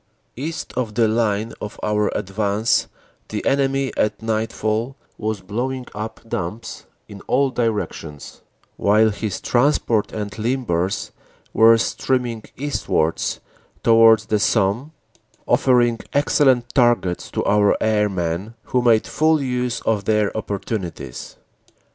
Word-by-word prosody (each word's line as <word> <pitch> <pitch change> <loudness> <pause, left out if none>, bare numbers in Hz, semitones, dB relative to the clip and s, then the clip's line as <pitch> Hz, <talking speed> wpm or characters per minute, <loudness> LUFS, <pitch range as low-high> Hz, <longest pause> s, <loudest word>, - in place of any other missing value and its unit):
"East 155 +6 -5
of 115 -4 -2
the 115 -2 +3
line 110 -1 0
of 105 - -7
our 105 -1 +1
advance 100 +3 0 0.4
the - - -4
enemy 135 0 +1
at 105 -1 0
nightfall 110 +2 -2 0.2
was 110 -2 -2
blowing 125 +7 -3
up 110 +2 -6
dumps 105 +2 -5 0.2
in 100 - -11
all 135 +1 +2
directions, 105 - -3 0.4
while 110 +2 +4
his 105 -1 -4
transport 120 -4 +1
and 105 -1 -4
limbers 110 -7 -1 0.4
were 115 +1 +6
streaming 120 -1 -1
eastwards 130 - -1 0.4
towards 115 -2 +6
the 110 -1 0
Somme, 110 +7 +1 0.6
offer 125 -2 +4
ing 120 -1 +1
excellent 130 -4 +2
targets 120 -8 +2
to - - -3
our 105 0 +3
airmen, 105 -2 -1
who 125 - 0
made 115 -2 +4
full 155 0 +2
use 125 -3 -2
of 105 -3 0
their 105 -2 +1
opportunities. 95 - -5
110 Hz, 120 wpm, -21 LUFS, 105-125 Hz, 0.6 s, were